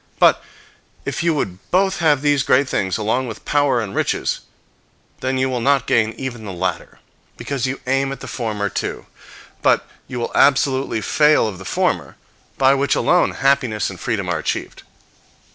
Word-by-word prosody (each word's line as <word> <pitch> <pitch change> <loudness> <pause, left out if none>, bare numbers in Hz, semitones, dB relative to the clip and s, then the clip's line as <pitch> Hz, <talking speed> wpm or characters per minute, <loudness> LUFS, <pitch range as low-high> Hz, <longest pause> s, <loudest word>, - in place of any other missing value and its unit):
But - - +4 0.6
if - - -3
you 165 -1 +2
would 95 -10 -3
both 190 +1 +2
have 150 -4 +3
these 145 -2 +3
great 135 0 +3
things, 95 -7 -1
along 115 +4 0
with 110 - -8
power 145 -4 +2
and 105 -4 -4
riches, - - -1 0.8
then 130 0 -1
you 130 0 +1
will 125 -2 -2
not 135 0 +2
gain 110 -1 +2
even 125 -4 -5
the 100 - -6
latter, 90 -1 -3 0.4
because 135 -3 -2
you 135 +1 -3
aim 135 +1 +1
at 135 - -6
the - - -8
former 105 -4 -2
too: - - -4 0.6
but - - +2 0.2
you 125 -2 -5
will 120 - -3
absolutely 135 -4 +2
fail 150 0 +3
of 95 -4 -6
the 95 - -10
former, - - -1 0.4
by 135 0 +5
which 140 +1 +1
alone 180 - +3
happiness 130 -7 +1
and 95 - -10
freedom 110 -6 -2
are 85 -3 -1
achieved. - - -4
130 Hz, 175 wpm, -20 LUFS, 110-140 Hz, 0.8 s, by